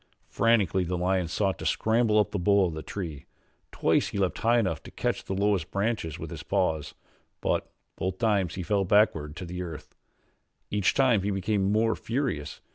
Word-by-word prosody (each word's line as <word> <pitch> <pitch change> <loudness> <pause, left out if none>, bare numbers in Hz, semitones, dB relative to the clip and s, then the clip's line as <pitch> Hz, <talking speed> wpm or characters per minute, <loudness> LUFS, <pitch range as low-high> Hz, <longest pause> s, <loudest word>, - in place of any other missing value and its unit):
Frantically 105 -5 +2
the 90 +1 -2
lion 90 0 +1
sought 95 +3 -1
to - - -6
scramble 110 -1 +2
up 105 - +3
the 100 - -2
bole 100 +2 +4
of 85 - -2
the 80 - -5
tree. 80 -6 -6 0.4
Twice - - +2
he - - -5
leaped 95 -2 0
high 115 +2 +3
enough 95 -9 0
to - - -11
catch - - -2
the 95 - -4
lowest 100 -3 +1
branches 100 -6 -1
with - - -7
his - - -6
paws, 80 -2 -1 0.4
but - - -1 0.3
both 95 0 -2
times 100 -6 +1
he 90 - -4
fell 100 +2 +1
backward 90 -7 +2
to 90 - -6
the 90 +1 -5
earth. 80 -4 -8 0.8
Each 105 -3 +2
time 125 -6 +4
he 100 - -1
became 100 0 0
more 110 +1 +2
furious. 115 - -3
95 Hz, 190 wpm, -27 LUFS, 90-105 Hz, 0.8 s, bole